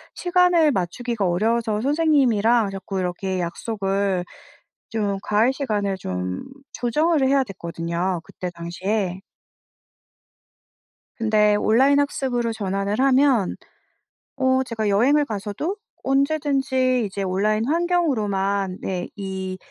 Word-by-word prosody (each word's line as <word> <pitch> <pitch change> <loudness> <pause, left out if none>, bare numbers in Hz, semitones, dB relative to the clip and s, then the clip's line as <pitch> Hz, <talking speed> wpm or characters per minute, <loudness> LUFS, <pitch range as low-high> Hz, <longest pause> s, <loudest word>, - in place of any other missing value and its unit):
시간을 355 -3 +3
맞추기가 215 +3 -2
어려워서 215 +4 0
선생님이랑 245 -8 +3
자꾸 195 0 -5
이렇게 185 +1 -2
약속을 195 +1 -1 0.6
좀 205 -3 -1
과외 220 +4 +3
시간을 210 -8 -1
좀 90 - -4 0.3
조정을 300 +5 +1
해야 275 0 +3
됐거든요 170 -2 -3
그때 180 - -6
당시에. 185 +3 -3 2.0
근데 215 -2 +3
온라인 265 +7 +4
학습으로 250 -5 -1
전환을 200 0 -2
하면 265 -5 +3 0.8
어 260 -1 +2
제가 225 -4 -2
여행을 270 +9 +3
가서도 215 - -4 0.3
언제든지 270 -3 +1
이제 195 0 -4
온라인 210 +4 0
환경으로만 210 - 0
네 180 -2 -3
이 190 -2 -5
215 Hz, 255 characters per minute, -23 LUFS, 195-265 Hz, 2.0 s, 온라인